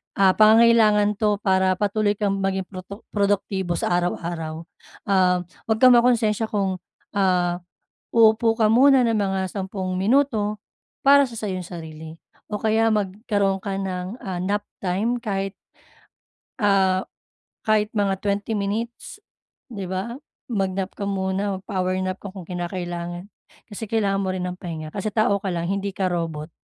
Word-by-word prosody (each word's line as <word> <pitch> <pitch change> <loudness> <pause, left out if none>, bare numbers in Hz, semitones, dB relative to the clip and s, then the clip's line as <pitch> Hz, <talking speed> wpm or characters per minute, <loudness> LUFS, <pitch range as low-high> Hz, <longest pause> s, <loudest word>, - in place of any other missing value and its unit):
Ah, 195 -1 +5
pangangailangan 215 -1 +5
'to 210 -1 +2
para 190 -1 +3
patuloy 205 +1 +1
kang 200 -1 -1
maging 190 0 0
protu 185 +3 -10
produktibo 200 -3 0
sa - - -1
araw-araw. 165 -2 -3 0.4
Ah, 185 -2 +2 0.2
'wag 220 -1 +2
kang 255 - +9
makunsensya 235 -3 +3
kung, 195 -4 -1 0.3
ah, 180 -3 +1 0.5
uupo 225 0 +4
ka 225 - +3
muna 265 +2 +6
ng 230 - +1
mga 190 -3 -1
sampung 190 -1 -4
minuto 215 -1 +2 0.5
para 280 0 +7
sa 230 -2 -9
sa 215 - -4
yung 185 0 -3
sarili. 160 -2 -9 0.3
O 210 - -2
kaya 220 +1 +2
magkaroon 200 -1 0
ka 200 -2 -3
ng, 185 +2 -4
ah, 185 -2 -4
nap 205 +2 -1 0.2
time 195 +6 0
kahit, 195 -3 -3 1.0
ah, 190 -3 +3 0.6
kahit 215 -1 +2
mga 200 -2 +1
20 205 +1 -1
minutes, 225 - -4 0.5
di 200 -4 -5
ba? 190 +5 -3 0.4
Mag-nap 195 -2 -1
ka 200 - -4
muna, 195 0 -1
mag-power 185 -2 -2
nap 185 0 -2
ka 200 - -8
kung 190 -3 -8
kinakailangan. 175 0 -5 0.4
Kasi 205 +2 -5
kailangan 200 -3 +1
mo 190 - -1
rin 185 - -3
ang 180 - -4
pahinga 160 -3 -6
kasi 200 +4 -4
tao 200 -1 +2
ka 195 - -5
lang, 170 -1 -2
hindi 200 0 -2
ka 190 - 0
robot. 165 -2 -3
195 Hz, 150 wpm, -23 LUFS, 185-215 Hz, 1.0 s, kang